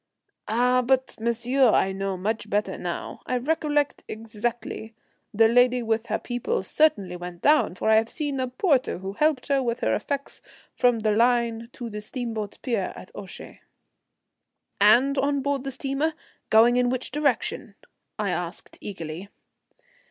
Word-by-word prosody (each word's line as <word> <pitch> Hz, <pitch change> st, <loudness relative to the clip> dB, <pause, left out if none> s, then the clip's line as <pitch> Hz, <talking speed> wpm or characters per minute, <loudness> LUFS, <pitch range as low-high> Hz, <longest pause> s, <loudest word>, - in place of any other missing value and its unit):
"Ah, 250 Hz, +3 st, +3 dB
but, 260 Hz, +1 st, +1 dB
monsieur, 235 Hz, +3 st, +2 dB
I 195 Hz, -, +3 dB
know 195 Hz, 0 st, -3 dB
much 215 Hz, +3 st, -2 dB
better 205 Hz, -1 st, 0 dB
now. 175 Hz, -1 st, -5 dB
I 255 Hz, -, 0 dB
recollect 295 Hz, +1 st, 0 dB
exactly. 225 Hz, 0 st, -5 dB, 0.4 s
The 225 Hz, 0 st, +5 dB
lady 245 Hz, +1 st, +4 dB
with 225 Hz, 0 st, -1 dB
her -, -, 0 dB
people 245 Hz, -, -2 dB
certainly 205 Hz, -, +2 dB
went 175 Hz, -1 st, -8 dB
down, 300 Hz, -11 st, +4 dB
for 185 Hz, -, -3 dB
I 220 Hz, 0 st, +6 dB
have 225 Hz, +1 st, +2 dB
seen 290 Hz, -3 st, -3 dB
a 255 Hz, -, 0 dB
porter 260 Hz, +1 st, +1 dB
who 190 Hz, +2 st, -6 dB
helped 300 Hz, +2 st, +1 dB
her 275 Hz, -1 st, +3 dB
with 240 Hz, -1 st, -2 dB
her -, -, +1 dB
effects 280 Hz, -1 st, -3 dB, 0.3 s
from 245 Hz, -2 st, +2 dB
the 215 Hz, 0 st, +2 dB
line 235 Hz, 0 st, +2 dB
to 240 Hz, -, -6 dB
the 210 Hz, -2 st, -6 dB
steamboat 220 Hz, -2 st, -5 dB
pier 230 Hz, -7 st, -1 dB
at -, -, -11 dB
Ouchy." 195 Hz, -2 st, -10 dB, 1.2 s
"And 245 Hz, +7 st, +5 dB
on 280 Hz, 0 st, +1 dB
board 280 Hz, -2 st, -1 dB
the -, -, -2 dB
steamer? 275 Hz, +4 st, -1 dB, 0.3 s
Going 235 Hz, +3 st, +6 dB
in 250 Hz, 0 st, +3 dB
which 255 Hz, 0 st, -2 dB
direction?" 285 Hz, -2 st, -1 dB, 0.4 s
I -, -, -1 dB
asked -, -, -5 dB
eagerly. 175 Hz, -1 st, -7 dB
240 Hz, 155 wpm, -25 LUFS, 215-265 Hz, 1.2 s, I